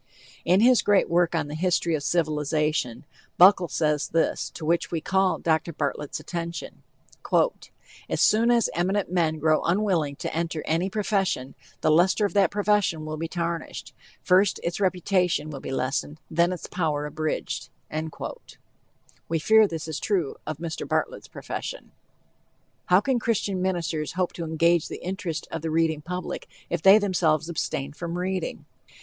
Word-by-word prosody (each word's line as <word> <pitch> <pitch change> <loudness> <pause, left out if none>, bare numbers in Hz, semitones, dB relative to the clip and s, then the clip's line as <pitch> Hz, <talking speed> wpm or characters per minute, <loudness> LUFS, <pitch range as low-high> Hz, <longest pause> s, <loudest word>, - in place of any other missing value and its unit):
In 180 +4 +4
his 250 +1 +6
great 205 -2 +3
work 175 0 +2
on 160 -3 0
the 145 - -7
History 170 0 +1
of 155 - 0
Civilization, 150 -4 0 0.3
Buckle 185 0 +7
says 150 +1 0
this, 165 0 0
to 160 - -6
which 170 +2 +1
we 165 - -2
call 190 +3 +1
Dr. 160 0 0
Bartlett's 150 0 -3
attention: 170 +2 -6 1.3
"As - - -1
soon 225 +2 +4
as 235 -2 +4
eminent 190 +2 0
men 165 -3 +1
grown 155 0 +2
unwilling 170 -6 +1
to - - -5
enter 165 -2 -2
any 170 +4 0
profession, 195 -10 -1 0.3
the 155 - +3
luster 185 +6 +4
of 200 - -2
that 195 -4 +4
profession 205 -6 +1
will 155 0 -4
be 165 +1 -3
tarnished; 170 -1 -4 0.3
first 185 +2 +3
its 170 +2 -2
reputation 180 -4 +1
will 140 - -6
be - - -7
lessened, 135 +3 -2
then 170 +2 +3
its 180 - -5
power 150 -4 -1
abridged." 155 +1 -3 1.6
We 165 - +1
fear 220 +6 +5
this 165 -3 -5
is 155 -2 -4
true 180 -9 -1
of 155 -2 -3
Mr. 165 0 -5
Bartlett's - - -2
profession. - - -6 1.0
How 180 +2 +5
can 260 +1 +1
Christian 205 -5 -1
ministers 170 -4 -1
hope 185 -1 -1
to 170 - -5
engage 165 +1 +2
the - - -8
interest 180 -3 -4
of - - -4
the 160 - -3
reading 160 -1 +1
public 180 +3 -5 0.2
if 170 - -1
they 195 +4 +8
themselves 170 -6 +1
abstain 140 -4 -3
from 170 +2 -5
reading? 185 0 -3
170 Hz, 155 wpm, -25 LUFS, 155-190 Hz, 1.6 s, they